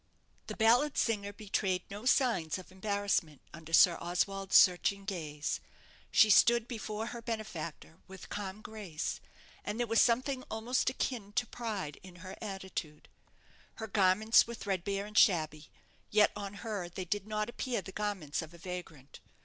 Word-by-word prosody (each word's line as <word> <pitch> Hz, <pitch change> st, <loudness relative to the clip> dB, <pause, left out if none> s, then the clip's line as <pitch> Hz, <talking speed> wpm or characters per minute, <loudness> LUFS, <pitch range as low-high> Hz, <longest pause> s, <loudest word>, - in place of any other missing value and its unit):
The -, -, -5 dB
ballad 245 Hz, +6 st, +4 dB
singer 205 Hz, -3 st, 0 dB
betrayed 195 Hz, -3 st, -1 dB
no 205 Hz, +4 st, -7 dB
signs 230 Hz, -, +2 dB
of 185 Hz, 0 st, -11 dB
embarrassment 195 Hz, -6 st, -1 dB
under 160 Hz, 0 st, -11 dB
Sir 170 Hz, +1 st, +6 dB
Oswald's 190 Hz, +3 st, -1 dB
searching 195 Hz, +2 st, +5 dB
gaze. 155 Hz, -6 st, -3 dB, 0.5 s
She 215 Hz, -, +6 dB
stood 235 Hz, +2 st, +5 dB
before 220 Hz, -2 st, -4 dB
her 235 Hz, -, -7 dB
benefactor 185 Hz, -8 st, -6 dB
with 190 Hz, 0 st, -11 dB
calm 205 Hz, +1 st, -5 dB
grace; 200 Hz, -8 st, -5 dB, 0.4 s
and 210 Hz, +3 st, -4 dB
there 240 Hz, -, +2 dB
was 225 Hz, 0 st, +3 dB
something 255 Hz, +2 st, +2 dB
almost 235 Hz, +4 st, 0 dB
akin 235 Hz, -5 st, -3 dB
to 245 Hz, -, +1 dB
pride 210 Hz, -12 st, -5 dB
in 185 Hz, -1 st, -13 dB
her 185 Hz, -, -7 dB
attitude. 190 Hz, -7 st, -6 dB, 0.7 s
Her 220 Hz, -, -5 dB
garments 210 Hz, +2 st, +4 dB
were 235 Hz, -, -5 dB
threadbare 195 Hz, -1 st, -2 dB
and 210 Hz, 0 st, -11 dB
shabby: 155 Hz, -7 st, +3 dB, 0.4 s
yet 210 Hz, 0 st, +5 dB
on 200 Hz, -1 st, -6 dB
her 200 Hz, -6 st, -3 dB
they 185 Hz, +1 st, -6 dB
did 205 Hz, +3 st, -2 dB
not 215 Hz, 0 st, -1 dB
appear 240 Hz, -3 st, -3 dB
the 190 Hz, -, -8 dB
garments 195 Hz, -8 st, -3 dB
of 160 Hz, +1 st, -10 dB
a -, -, -12 dB
vagrant. 170 Hz, -5 st, -8 dB
200 Hz, 155 wpm, -32 LUFS, 180-220 Hz, 0.7 s, Sir